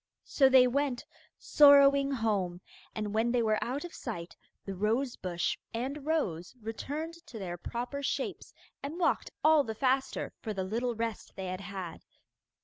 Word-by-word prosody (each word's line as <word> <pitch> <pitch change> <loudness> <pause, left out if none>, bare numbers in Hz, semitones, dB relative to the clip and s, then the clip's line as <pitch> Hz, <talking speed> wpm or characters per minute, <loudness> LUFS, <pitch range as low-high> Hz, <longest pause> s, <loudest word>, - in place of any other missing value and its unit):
So 270 -2 +4
they 260 -1 +7
went 265 0 0 0.3
sorrowing 280 -1 +6
home, 205 -8 0 0.4
and 210 -1 -3
when 225 +2 +2
they 240 -1 +2
were 215 -1 +1
out 275 +7 -3
of 345 - -9
sight 175 -8 -6 0.3
the 195 - -4
rose 225 +7 0
bush 175 -2 -2 0.2
and 275 +5 -4
rose 195 - -1
returned 300 +9 -5
to 230 - -9
their 180 -4 -4
proper 245 +9 -4
shapes 280 - -3 0.3
and 285 +4 -5
walked 355 - +1
all 310 -1 +6
the 220 -4 -5
faster 265 +3 0
for 215 -2 -5
the 190 - -1
little 235 +5 -1
rest 225 -1 -4
they 190 - -5
had 185 +1 -4
had. 190 -3 -7
235 Hz, 160 wpm, -31 LUFS, 200-280 Hz, 0.4 s, they